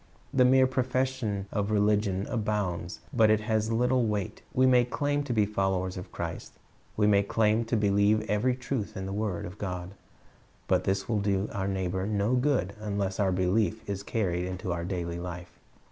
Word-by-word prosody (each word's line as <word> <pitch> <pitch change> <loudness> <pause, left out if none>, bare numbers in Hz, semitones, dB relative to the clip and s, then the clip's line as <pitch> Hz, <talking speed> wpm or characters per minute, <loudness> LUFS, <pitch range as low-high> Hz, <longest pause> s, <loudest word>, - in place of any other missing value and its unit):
The 130 -1 +5
mere 130 +1 +6
profession 130 -5 -1
of 105 -1 -1
religion 105 -2 +2
abounds, 105 -7 -2
but 115 -4 +5
it 110 0 +3
has 110 0 0
little 125 +1 +2
weight. 105 -3 -3
We 130 - +3
may 125 -1 +5
claim 145 +4 -1
to 135 - -4
be 110 -3 +3
followers 95 -3 -1
of 90 - -8
Christ, - - -5 0.4
we 105 - +3
may 100 -1 +5
claim 110 +2 +1
to 115 +1 0
believe 105 +1 +2
every 120 +5 +1
truth 125 -5 -4
in 95 - -4
the 95 - -4
word 105 -4 -2
of 90 +4 -9
God; 90 -2 -4 0.8
but 90 0 +2
this 95 0 0
will 110 -3 +1
do 100 0 0
our 95 -1 -2
neighbor 95 0 -1
no 105 +2 +1
good 125 -7 +1
unless 100 -2 -2
our 100 -2 +2
belief 100 +4 0
is 100 -1 -3
carried 90 -5 -1
into 95 0 -4
our 85 0 -3
daily 85 -2 -3
life. 90 0 -8
105 Hz, 180 wpm, -28 LUFS, 95-115 Hz, 0.8 s, mere